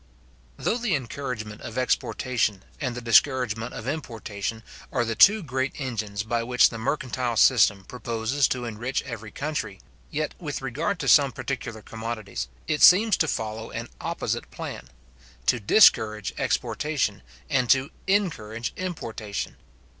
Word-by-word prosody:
Though 235 Hz, -, 0 dB
the 225 Hz, -8 st, +1 dB
encouragement 125 Hz, -5 st, -5 dB
of 110 Hz, -, -7 dB
exportation, 125 Hz, -5 st, 0 dB, 0.2 s
and 125 Hz, -4 st, -2 dB
the 125 Hz, -, -6 dB
discouragement 120 Hz, -1 st, +3 dB
of 115 Hz, -, -7 dB
importation, 115 Hz, -6 st, -4 dB, 0.3 s
are 120 Hz, -, +1 dB
the 115 Hz, -, -1 dB
two 205 Hz, -, +6 dB
great 130 Hz, -1 st, -2 dB
engines 110 Hz, -7 st, -3 dB
by 115 Hz, +2 st, -1 dB
which 125 Hz, +1 st, +4 dB
the 115 Hz, -, -6 dB
mercantile 125 Hz, -1 st, -1 dB
system 105 Hz, -6 st, +5 dB
proposes 125 Hz, +2 st, 0 dB
to 125 Hz, -1 st, -2 dB
enrich 120 Hz, +4 st, -3 dB
every 110 Hz, -2 st, -7 dB
country, 145 Hz, -5 st, -4 dB, 0.3 s
yet, 150 Hz, 0 st, -2 dB
with 150 Hz, -5 st, -4 dB
regard 155 Hz, +10 st, -1 dB
to -, -, -3 dB
some 140 Hz, -3 st, +6 dB
particular 115 Hz, -3 st, -5 dB
commodities, 110 Hz, -, -5 dB, 0.2 s
it 150 Hz, -, 0 dB
seems 205 Hz, +3 st, +7 dB
to 160 Hz, -, +2 dB
follow 110 Hz, -3 st, -3 dB
an 115 Hz, +1 st, -6 dB
opposite -, -, -3 dB
plan: -, -, -7 dB, 0.6 s
to 120 Hz, -, +3 dB
discourage 110 Hz, -, +4 dB
exportation, 140 Hz, -10 st, -1 dB, 0.3 s
and 130 Hz, -3 st, +1 dB
to 135 Hz, +2 st, +3 dB, 0.2 s
encourage 120 Hz, -, 0 dB
importation. 115 Hz, -, -4 dB
120 Hz, 140 wpm, -26 LUFS, 110-140 Hz, 0.6 s, seems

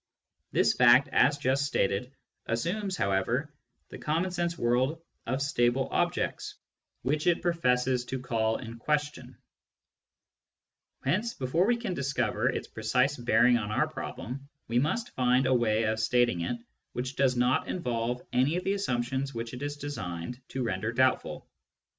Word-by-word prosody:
This -, -, +3 dB
fact, 125 Hz, +2 st, +6 dB
as 145 Hz, +3 st, +4 dB
just 135 Hz, +1 st, +1 dB
stated, 125 Hz, -3 st, 0 dB, 0.4 s
assumes, 185 Hz, -, -1 dB
however, 115 Hz, +10 st, 0 dB, 0.4 s
the -, -, -9 dB
common 165 Hz, +5 st, 0 dB
sense 175 Hz, -1 st, -1 dB
world 130 Hz, +6 st, +1 dB, 0.3 s
of 130 Hz, +3 st, 0 dB
stable 130 Hz, -2 st, +1 dB
objects -, -, -1 dB, 0.5 s
which 150 Hz, +6 st, 0 dB
it 175 Hz, -1 st, +2 dB
professes 125 Hz, -7 st, +1 dB
to 130 Hz, +1 st, -4 dB
call 110 Hz, -2 st, 0 dB
in 115 Hz, -1 st, -8 dB
question; 145 Hz, -2 st, -2 dB, 1.7 s
hence, 210 Hz, -, 0 dB
before 150 Hz, +9 st, +1 dB
we 240 Hz, 0 st, +3 dB
can 235 Hz, -6 st, -3 dB
discover 140 Hz, -4 st, 0 dB
its -, -, -3 dB
precise 125 Hz, +6 st, +1 dB
bearing 120 Hz, 0 st, +4 dB
on 105 Hz, -2 st, -4 dB
our 130 Hz, +8 st, +1 dB
problem, 135 Hz, -2 st, -7 dB, 0.2 s
we 120 Hz, +1 st, +2 dB
must 225 Hz, -, -1 dB
find 125 Hz, +1 st, +3 dB
a 130 Hz, -, +3 dB
way 115 Hz, -3 st, +2 dB
of 110 Hz, 0 st, 0 dB
stating 115 Hz, -4 st, +2 dB
it 120 Hz, +8 st, -2 dB, 0.4 s
which 130 Hz, +2 st, -4 dB
does 135 Hz, -2 st, +2 dB
not 125 Hz, +1 st, +2 dB
involve 125 Hz, -6 st, -2 dB
any 130 Hz, +6 st, +3 dB
of 180 Hz, -, -3 dB
the 195 Hz, -, +1 dB
assumptions 130 Hz, -6 st, -2 dB
which 115 Hz, +1 st, -5 dB
it 125 Hz, -, -7 dB
is 145 Hz, 0 st, -3 dB
designed 120 Hz, -5 st, -5 dB
to 130 Hz, -, -3 dB
render 110 Hz, 0 st, -1 dB
doubtful. 130 Hz, +2 st, +1 dB
130 Hz, 150 wpm, -29 LUFS, 120-145 Hz, 1.7 s, fact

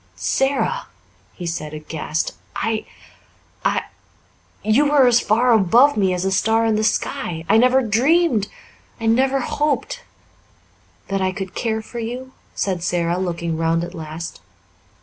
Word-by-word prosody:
"Sara!" 270 Hz, +1 st, 0 dB, 0.5 s
he 180 Hz, -, -8 dB
said, 155 Hz, -2 st, -4 dB
aghast. 155 Hz, +1 st, -3 dB, 0.2 s
"I 220 Hz, 0 st, -2 dB, 0.8 s
I -, -, +1 dB, 0.8 s
you 220 Hz, +8 st, +3 dB
were 285 Hz, -3 st, +5 dB
as 240 Hz, -1 st, +5 dB
far 240 Hz, +4 st, +2 dB
above 230 Hz, +8 st, +5 dB
me 195 Hz, -3 st, +2 dB
as 180 Hz, +1 st, -1 dB
a 190 Hz, -, +1 dB
star 225 Hz, +4 st, +2 dB
in 220 Hz, -1 st, +2 dB
the 215 Hz, -, 0 dB
sky 165 Hz, -6 st, -1 dB
I -, -, +5 dB
never 255 Hz, +3 st, +4 dB
dreamed 245 Hz, -, +2 dB, 0.5 s
I 225 Hz, -, -4 dB
never 265 Hz, +4 st, +2 dB
hoped 300 Hz, -, -1 dB, 0.5 s
" -, -, -35 dB
"That 195 Hz, 0 st, -1 dB
I 185 Hz, 0 st, +1 dB
could 190 Hz, -1 st, -6 dB
care 220 Hz, -2 st, -2 dB
for 235 Hz, -, -7 dB
you?" 250 Hz, +3 st, -5 dB, 0.2 s
said 185 Hz, -3 st, -1 dB
Sara, 175 Hz, 0 st, 0 dB
looking 170 Hz, -3 st, -2 dB
round 165 Hz, +1 st, +1 dB
at 175 Hz, +1 st, -6 dB
last. 160 Hz, 0 st, -7 dB
215 Hz, 150 wpm, -21 LUFS, 175-245 Hz, 0.8 s, were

